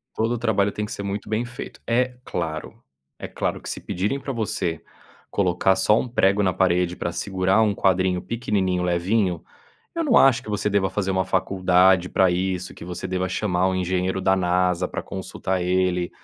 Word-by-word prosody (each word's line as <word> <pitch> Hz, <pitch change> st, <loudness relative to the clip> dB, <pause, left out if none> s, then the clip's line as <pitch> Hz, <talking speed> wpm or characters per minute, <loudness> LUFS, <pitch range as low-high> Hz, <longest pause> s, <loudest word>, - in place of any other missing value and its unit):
Todo 115 Hz, +2 st, 0 dB
o -, -, -1 dB
trabalho 105 Hz, -4 st, +1 dB
tem 105 Hz, -, -3 dB
que -, -, -9 dB
ser 100 Hz, -, -5 dB
muito 100 Hz, +1 st, -4 dB
bem 110 Hz, +3 st, 0 dB
feito, 120 Hz, +1 st, -9 dB
é 125 Hz, +2 st, +1 dB
claro. 80 Hz, -7 st, -5 dB, 0.4 s
É -, -, -5 dB
claro -, -, -3 dB
que -, -, -7 dB
se -, -, -4 dB
pedirem 100 Hz, +10 st, -2 dB
pra 135 Hz, -, -5 dB
você 95 Hz, -7 st, -2 dB, 0.5 s
colocar 95 Hz, 0 st, +2 dB
só 105 Hz, +3 st, +3 dB
um -, -, -3 dB
prego 100 Hz, -4 st, +2 dB
na 95 Hz, -2 st, +2 dB
parede 90 Hz, -1 st, +1 dB
pra 85 Hz, -, -3 dB
segurar 95 Hz, +3 st, +1 dB
um 105 Hz, -2 st, +2 dB
quadrinho 95 Hz, -1 st, +1 dB
pequenininho, 95 Hz, -6 st, -1 dB
levinho, 90 Hz, +1 st, 0 dB, 0.5 s
eu 335 Hz, -, -1 dB
não 270 Hz, -6 st, +3 dB
acho 135 Hz, -3 st, +5 dB
que -, -, -13 dB
você 105 Hz, 0 st, -1 dB
deva 100 Hz, -1 st, +2 dB
fazer 95 Hz, -2 st, -1 dB
uma 95 Hz, 0 st, +1 dB
faculdade 95 Hz, -1 st, +3 dB
pra 95 Hz, -1 st, +3 dB
isso, 90 Hz, 0 st, -2 dB
que -, -, -10 dB
você 90 Hz, +1 st, -5 dB
deva 95 Hz, 0 st, -2 dB
chamar 90 Hz, -1 st, 0 dB
um 95 Hz, -, -1 dB
engenheiro 95 Hz, +1 st, -1 dB
da 95 Hz, 0 st, +3 dB
Nasa 90 Hz, 0 st, +1 dB
pra -, -, -5 dB
consultar 95 Hz, -1 st, -4 dB
ele, 90 Hz, -1 st, +1 dB
95 Hz, 190 wpm, -23 LUFS, 90-105 Hz, 0.5 s, acho